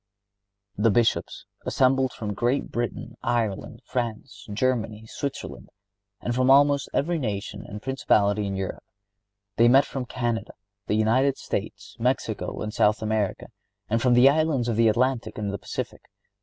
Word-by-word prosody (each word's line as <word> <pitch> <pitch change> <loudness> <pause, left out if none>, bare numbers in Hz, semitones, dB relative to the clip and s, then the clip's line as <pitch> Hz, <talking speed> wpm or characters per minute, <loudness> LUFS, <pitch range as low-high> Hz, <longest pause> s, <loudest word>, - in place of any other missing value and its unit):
The 110 +3 +4
Bishops 115 +2 +1 0.2
assembled 130 0 +2
from 105 -4 -5
Great 120 +7 0
Britain, 120 0 -4
Ireland, 115 -5 -2
France, 115 -3 -4
Germany, 110 -1 -1
Switzerland 140 +5 -6 0.5
and 120 - -2
from 130 +1 +2
almost 140 +1 +5
every 165 +4 0
nation 100 -4 -4
and 105 +1 -8
principality 105 -6 +2
in 100 - -3
Europe. 95 -1 -4 0.8
They 115 - +6
met 135 +3 +6
from 130 -2 -4
Canada, 120 -3 -2 0.3
the 105 - +1
United 130 +6 +2
States, - - -5
Mexico - - -1
and 105 0 -4
South 105 +1 +2
America, 110 -2 -1 0.4
and 115 +1 +2
from 125 -1 +4
the 125 +2 +7
islands 145 -4 +2
of 115 - 0
the 115 +1 +4
Atlantic 120 -1 +1
and 105 -2 -3
the 100 - -4
Pacific. - - -5
120 Hz, 145 wpm, -25 LUFS, 105-130 Hz, 0.8 s, the